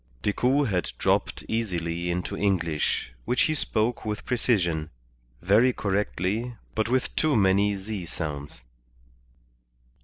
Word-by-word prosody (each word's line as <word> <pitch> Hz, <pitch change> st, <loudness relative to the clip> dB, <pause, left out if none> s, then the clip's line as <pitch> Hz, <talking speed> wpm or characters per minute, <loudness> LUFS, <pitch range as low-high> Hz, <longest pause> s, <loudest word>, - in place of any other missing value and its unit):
Decoud 125 Hz, +6 st, +2 dB
had 90 Hz, -3 st, 0 dB
dropped -, -, 0 dB
easily 85 Hz, -6 st, -2 dB
into 90 Hz, 0 st, -2 dB
English, 85 Hz, -10 st, 0 dB
which 125 Hz, -, +2 dB
he 155 Hz, -, +2 dB
spoke 120 Hz, -5 st, 0 dB
with 105 Hz, -1 st, -4 dB
precision, 85 Hz, -11 st, +1 dB, 0.5 s
very 110 Hz, +8 st, +5 dB
correctly, 105 Hz, +3 st, -1 dB, 0.2 s
but 110 Hz, +1 st, 0 dB
with 130 Hz, 0 st, 0 dB
too 155 Hz, -3 st, +2 dB
many 100 Hz, 0 st, +3 dB
z 100 Hz, -1 st, -5 dB
sounds. 75 Hz, -6 st, -5 dB
100 Hz, 115 wpm, -26 LUFS, 85-115 Hz, 0.5 s, very